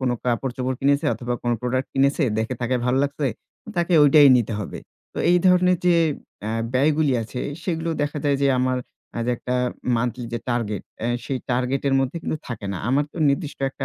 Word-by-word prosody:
কোনো 125 -2 +1
কাপড়-চোপড় 125 +1 -1
কিনেছে 140 +1 +2
অথবা 120 +2 -3
কোনো 120 -1 +1
প্রোডাক্ট 130 +1 -1
কিনেছে, 140 +3 +2 0.2
দেখে 115 +3 -1
তাকে 125 +2 0
ভালো 130 +2 +2
লাগছে। 145 0 -2 0.5
তাকে 175 +1 0
ঐটাই 145 0 +7
নিতে 115 -2 0
হবে। 95 - -6 0.3
তো - - -6
এই 180 - +5
ধরনের 180 -1 +4
যে 175 - +5 0.5
অ্যা 110 +1 -3 0.2
ব্যয়গুলি 145 +1 +3
আছে 125 +3 -6 0.2
সেগুলো 165 -2 -2
দেখা 145 +1 -2
যায় 140 -1 +3
যে 140 - +4
আমার 130 0 +1 0.3
অ্যা 120 - -4
যে 125 - +2
একটা 125 +1 -3 0.4
মান্থলি 120 +1 -2
যে - - -1
টার্গেট, 110 -4 -1 0.2
অ্যা 115 - -1 0.2
সেই 135 - -2
টার্গেট 125 +2 0
এর 135 - +2
মধ্যে 135 +5 -2
কিন্তু - - -2
থাকে 115 -4 -5
না। 90 - -4
আমার 140 +3 +2
তো - - -9
নির্দিষ্ট 140 +1 -1
একটা - - -6
130 Hz, 195 wpm, -23 LUFS, 120-145 Hz, 0.5 s, ঐটাই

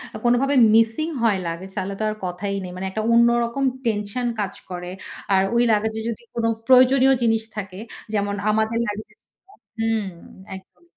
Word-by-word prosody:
আ - - -3
কোনোভাবে 255 +4 +3 0.2
মিসিং 225 +8 +3 0.2
হয় 210 -4 +3
লাগেজ, 170 +3 -6
তাহলে 195 0 -2
তো 215 - -1
আর 215 - -3
কথাই 180 +3 -3
নেই। 180 - -7
মানে 185 +1 -5
একটা 215 +3 -2
অন্যরকম 235 +2 +3 0.2
টেনশন 215 +2 -1
কাজ 200 -2 -2 0.2
করে। 180 0 -6 0.4
আর 190 - +5
ওই 235 - +4
লাগেজ 220 +1 +1
এ - - -4
যদি 225 - -5
কোনো 230 -1 0 0.2
প্রয়োজনীয় 260 +1 +6
জিনিস 225 -1 +2
থাকে 195 -2 -6 0.3
যেমন 200 -1 0
আমাদের 220 +1 +1
লাগেজ 210 +1 -5
ছিল - - -28 0.6
হুম, 225 -2 0 0.5
একদম। 185 -2 -15
220 Hz, 170 wpm, -22 LUFS, 195-235 Hz, 0.6 s, প্রয়োজনীয়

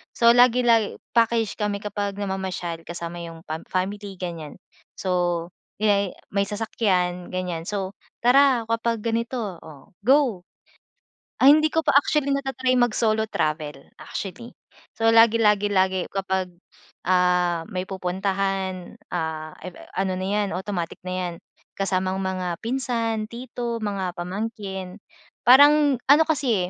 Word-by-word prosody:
So 235 0 +6
lagi-lagi 240 -3 +4 0.2
package 230 -2 +2
kami 205 -1 -1
kapag 205 -1 -3
namamasyal 190 -4 -4
kasama 170 0 -6
yung 165 0 -9
pam 160 +1 -5
family, 195 +1 -3
ganyan. 165 -5 -6 0.4
So, 175 -2 0 0.3
may 200 -3 +2 0.2
may 200 - +3
sasakyan, 190 -4 -1
ganyan. 180 -3 -3
So, 195 0 -4 0.2
tara 250 -2 +4
kapag 230 0 0
ganito! 230 +3 -2 0.2
Oh, 155 +4 -14
go. 255 -8 +3 1.0
Ay, 270 - +8
hindi 310 0 +3
ko 325 - +3
pa - - +3
actually 285 0 +2
nata-try 270 -2 0
mag-solo 220 -2 +2
travel, 150 -2 -2 0.2
actually. 235 +5 -7 0.4
So, 225 0 +2
lagi 230 0 +6
lagi 210 -1 +3
lagi 185 -1 +2
kapag, 190 -2 -2 0.6
ah, 180 -2 +2
may 185 0 -2
pupuntahan, 190 0 -2 0.2
ah, 160 -2 -4 0.4
ano 190 -1 0
na 185 - -3
yan, 205 -1 0
automatic 180 -2 -4
na 185 0 -5
yan, 180 -2 -2 0.4
kasamang 190 -1 0
mga 185 -2 -2
pinsan, 230 -3 -1
tito, 235 -1 -5
mga 195 -4 -2
pamangkin. 190 0 -5 0.5
Parang 285 +2 +7
ano 300 +3 +8
kasi 250 - 0
200 Hz, 125 wpm, -24 LUFS, 180-230 Hz, 1.0 s, Ay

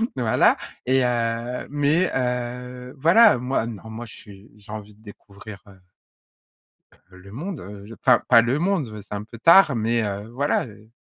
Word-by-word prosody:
voilà 120 -4 +2 0.3
et 130 +1 +2
heu, 120 0 -2
mais, 150 +5 +1
heu, 125 0 -4
voilà 185 - +6
moi 125 -1 -1
non, 110 -1 -9
moi 115 +2 -7
je 110 - -13
suis 100 0 -15
j'ai 105 0 -15
envie 105 -1 -9
de 105 - -25
découvrir, 100 -1 -13
heu 95 -1 -17 1.3
heu 95 - -15
le 95 +2 -15
monde, 160 - -6
heu, 100 +2 -10
je 115 - -11
enfin 125 0 +3
pas 115 -2 +7
le 125 +5 -1
monde, 175 - 0
beh, 105 -1 -9
c'est 105 - -6
un 105 - -5
peu 115 +2 -13
tard, 165 -1 +6
mais, 115 +1 0
heu, 100 +1 -5
voilà, 140 +5 -1
heu. 110 0 -16
120 Hz, 185 wpm, -23 LUFS, 105-130 Hz, 1.3 s, pas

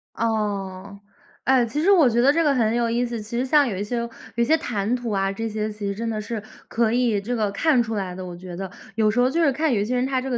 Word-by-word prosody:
哦， 200 -3 -2 0.5
哎， 260 -2 +4
其 285 +6 -2
实 355 - +2
我 325 -10 +6
觉 235 +1 +1
得 280 +3 +5
这 330 - +2
个 295 -3 +3
很 230 -3 +1
有 235 -1 +1
意 240 +2 +1
思。 235 -2 -4
其 230 +3 -5
实 255 - 0
像 290 +2 +4
有 200 -6 -3
一 200 - -2
些 240 +4 -4
有 235 0 -2 0.3
一 235 - +2
些 315 +7 +3
谈 220 -7 -2
吐 240 -2 -4
啊， 195 -1 0
这 225 +3 -4
些 215 0 -2
其 210 -1 -5
实 200 - -2
真 230 +1 -3
的 215 -1 -2
是 215 0 -5 0.2
可 225 -1 +1
以 235 -4 +1
这 240 +5 -3
个 215 -3 0
看 295 +1 +3
出 225 -1 -3
来 190 -3 -3
的， 185 0 -7
我 175 -1 -7
觉 180 0 -9
得。 190 +1 -5 0.3
有 215 -1 +3
时 235 +4 0
候 250 - +4
就 330 +5 0
是 285 -4 +3
看 300 -1 +1
有 210 - +1
一 205 - 0
些 250 +3 -1
人 250 - +1
他 265 -1 0
这 265 - -4
个 245 - 0
230 Hz, 325 characters per minute, -23 LUFS, 205-250 Hz, 0.5 s, 我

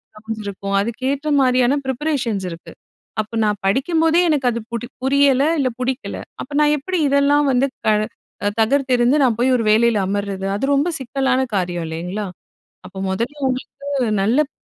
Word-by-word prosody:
Rounds 220 0 -6
இருக்கும். 200 0 -3
அதுக்கேற்ற 265 +7 -2
மாதிரியான 255 +1 +3
ப்ரிப்பரேஷன்ஸ் 260 -7 -1
இருக்கு. 165 0 -10 0.5
அப்போ 215 +2 -8
நான் 210 -1 +1
படிக்கும்போதே 320 - +2
எனக்கு 290 -4 +1
அது 235 - -3
புடி 235 0 -4 0.2
புரியல, 275 0 +4 0.2
இல்ல 265 -2 +2
பிடிக்கல. 260 +1 -3 0.2
அப்போ - - -9
நான் 300 0 +4
எப்படி 365 +6 -3
இதெல்லாம் 280 +1 +3
வந்து 255 +1 +3 0.2
கழ 215 - +4 0.6
தகர்த்தெறிந்து, 255 +2 +3
நான் 240 -4 +3
போய் 255 +2 +3
ஒரு 230 - 0
வேலையில 230 +1 +4
அமரது? 200 -1 -3
அது 210 - -1
ரொம்ப 290 +5 +2
சிக்கலான 265 0 0 0.2
காரியம் 175 -2 -1
இல்லைங்களா? 180 +6 -4 0.6
அப்போ 185 +1 -11
முதல்ல 235 +9 -2
உங்களுக்கு 255 +1 -4
வந்து 275 -4 0
நல்லப் 265 +9 +2
250 Hz, 150 wpm, -20 LUFS, 215-280 Hz, 0.6 s, புரியல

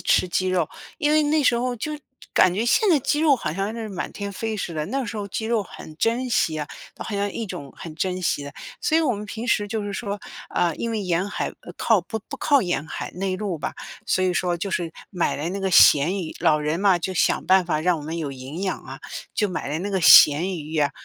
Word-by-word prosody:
吃 175 - +3
鸡 185 +2 0
肉。 180 -4 +1 0.3
因 300 -2 +2
为 310 - +5
那 300 +1 +2
时 250 - +5
候 245 +1 -1
就 305 +7 -4 0.4
感 185 - +5
觉 205 +5 -1
现 425 - +3
在 320 - +5
鸡 285 +3 0
肉 300 -4 +5
好 160 -10 -3
像 195 +5 -2
是 225 -2 -5
满 185 - -4
天 200 -1 -5
飞 220 +2 -3
似 185 - -4
的， 155 -1 -2
那 270 +5 -2
时 225 - -5
候 205 -1 -4
鸡 220 - -4
肉 225 -2 +1
很 160 -4 -11
珍 235 +8 0
稀 160 -8 +1
啊， 150 - -3 0.3
好 215 - -5
像 200 0 -1
一 225 - -4
种 140 -7 -7
很 165 -2 -8
珍 185 +2 -2
稀 155 - 0
的。 140 0 -8 0.3
所 315 - +2
以 - - +3
我 265 -7 +1
们 210 +1 -6
平 225 +3 -6
时 205 -4 +1
就 220 0 -2
是 205 0 -4
说， 200 0 -4 0.3
啊， 170 -2 +1
因 230 - -3
为 225 -2 -1
沿 180 +1 0
海， 205 - -2
呃， - - -11
靠 220 -4 +3
不 200 +5 -5
不 - - -5
靠 285 -4 +3
沿 175 -5 -2
海， - - -5
内 185 +1 -2
陆 195 -5 -3
吧， - - -4 0.3
所 185 - +2
以 185 - +2
说 175 0 0
就 195 +4 -4
是 170 -3 -2 0.2
买 180 -4 0
来 150 +4 -3
那 195 +2 -4
个 190 0 0
咸 170 +2 +6
鱼 160 - -7
老 160 -2 +4
人 150 +3 -1
嘛， 195 -3 +4
就 185 +2 -3
想 - - +2
办 190 0 +5
法 155 -3 0
让 175 +1 +2
我 - - -8
们 160 +3 -5
有 150 -4 -3
营 135 +7 -7
养 190 - -2
啊， - - -9 0.4
就 210 - +2
买 180 -6 -4
了 150 +2 -2
那 200 +3 -3
个 190 -1 0
咸 160 +2 +8
鱼 155 -1 -8
呀， 150 -3 +2
190 Hz, 275 characters per minute, -23 LUFS, 165-220 Hz, 0.4 s, 咸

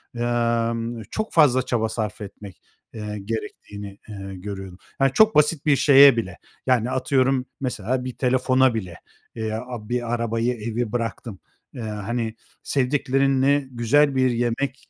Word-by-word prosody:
emm, 115 -1 -1
çok 215 0 -3
fazla 140 -6 +5
çaba 110 -2 -1
sarf 110 -1 -4
etmek, 100 -1 -10 0.3
eee, 105 -1 -5
gerektiğini, 105 -2 -6
eee, 100 -2 -7
görüyordum. 95 -1 -7 0.2
Yani, 135 -1 +4
çok 220 +5 +5
basit 150 0 +3
bir 150 -2 +5
şeye 140 -2 +7
bile. 95 -6 -3 0.3
Yani, 125 -1 +2
atıyorum 130 0 +1 0.2
mesela 125 0 -2
bir 130 - -5
telefona 130 0 +3
bile 95 -7 -5 0.4
veya 110 0 -3 0.3
bir 120 -1 -1
arabayı, 115 +1 0
evi 115 0 -3
bıraktım, 115 -3 -4 0.4
ııı, 120 - -6
hani, 110 +2 -3 0.3
sevdiklerinle 135 0 +1
güzel 135 +4 +2
bir 130 -1 +3
yemek, 120 +3 -2
120 Hz, 135 wpm, -23 LUFS, 110-130 Hz, 0.4 s, şeye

